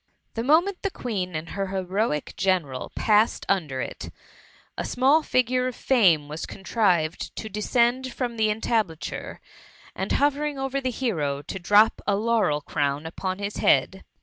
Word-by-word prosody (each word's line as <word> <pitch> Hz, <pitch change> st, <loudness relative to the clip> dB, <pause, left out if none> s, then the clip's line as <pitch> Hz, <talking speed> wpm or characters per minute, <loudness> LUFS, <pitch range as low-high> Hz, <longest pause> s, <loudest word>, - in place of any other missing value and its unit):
The 225 Hz, -, -2 dB
moment 335 Hz, +9 st, +2 dB
the 395 Hz, -, -1 dB
Queen 195 Hz, -, -4 dB
and 155 Hz, +2 st, -4 dB
her 195 Hz, -1 st, -3 dB
heroic 190 Hz, -3 st, -2 dB
general 175 Hz, -10 st, -1 dB
passed 215 Hz, 0 st, +2 dB
under 155 Hz, -10 st, 0 dB
it, -, -, -6 dB, 0.7 s
a -, -, -3 dB
small 270 Hz, +5 st, +3 dB
figure 255 Hz, -2 st, +1 dB
of 255 Hz, -, -4 dB
Fame 180 Hz, -, +3 dB
was 150 Hz, +2 st, -6 dB
contrived 185 Hz, -6 st, 0 dB
to 220 Hz, -, -6 dB
de 210 Hz, +1 st, -5 dB
scend 245 Hz, +3 st, +1 dB
from 240 Hz, -1 st, -3 dB
the 220 Hz, -1 st, +2 dB
entablature, 210 Hz, -6 st, -2 dB, 0.6 s
and, -, -, -3 dB
hovering 290 Hz, 0 st, +1 dB
over 270 Hz, 0 st, -2 dB
the 260 Hz, -, -1 dB
hero, 155 Hz, -, -2 dB
to 190 Hz, -, -6 dB
drop 205 Hz, +5 st, +4 dB
a 200 Hz, -, +3 dB
laurel 210 Hz, -8 st, +1 dB
crown 145 Hz, +1 st, -2 dB
upon 185 Hz, +3 st, -4 dB
his 200 Hz, +1 st, -4 dB
head. -, -, +2 dB
210 Hz, 155 wpm, -25 LUFS, 170-250 Hz, 0.7 s, drop